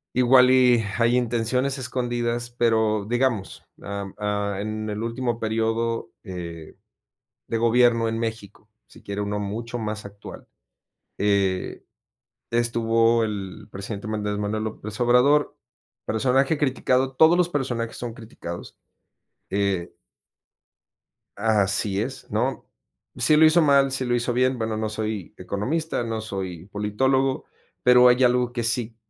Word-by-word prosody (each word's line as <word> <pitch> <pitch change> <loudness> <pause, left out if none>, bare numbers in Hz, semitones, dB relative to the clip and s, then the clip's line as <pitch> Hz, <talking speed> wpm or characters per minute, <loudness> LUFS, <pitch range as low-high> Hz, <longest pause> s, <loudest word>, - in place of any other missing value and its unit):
Igual, 125 0 +6
y 125 -3 +5
hay 120 +1 +3
intenciones 125 +3 0
escondidas, 120 -2 -2
pero 110 -3 +1
digamos, 120 -4 -1 0.2
ah, 100 -1 -5
ah, 105 -1 -2
en 110 +1 -4
el 105 +2 -4
último 115 0 -2
período, 115 +1 -1
eh, 85 -5 -8 0.7
de 115 - -2
gobierno 115 0 +3
en 115 0 -2
México, 110 -2 -6 0.2
si - - -17
quiere 100 0 -4
uno 105 0 -2
mucho 115 +4 -4
más 105 -1 -4
actual, 100 0 -11 0.7
eh, 100 -2 0 0.7
estuvo 115 -1 +2
el 100 -3 -6
presidente 100 +2 -6
Andrés 105 -1 -2
Manuel 105 +1 -2
López 110 -1 -6
Obrador, 125 +5 +3 0.5
personaje 135 +6 +1
criticado, 130 -1 +1
todos 160 +4 +6
los 175 -1 +2
personajes 120 -7 -3
son 120 -2 -5
criticados, 110 -7 -9 0.7
eh 100 -3 -1 1.5
Así 100 -1 +1
es, 130 +3 -6
¿no? 125 +5 -1 0.5
Si 155 - +3
lo 155 +1 +7
hizo 155 +2 +5
mal, 140 -3 +4
si 130 -1 -1
lo 120 0 +1
hizo 120 0 -1
bien, 130 +1 +2
bueno, 110 -1 -2
no 110 0 -1
soy 110 -3 -4
economista, 120 - -2
no 115 -1 -3
soy 95 -5 -6
politólogo, 130 +6 0 0.4
pero 125 0 +7
hay 125 +1 +4
algo 125 0 +2
que 120 -1 -2
sí 115 0 0
115 Hz, 130 wpm, -24 LUFS, 105-125 Hz, 1.5 s, lo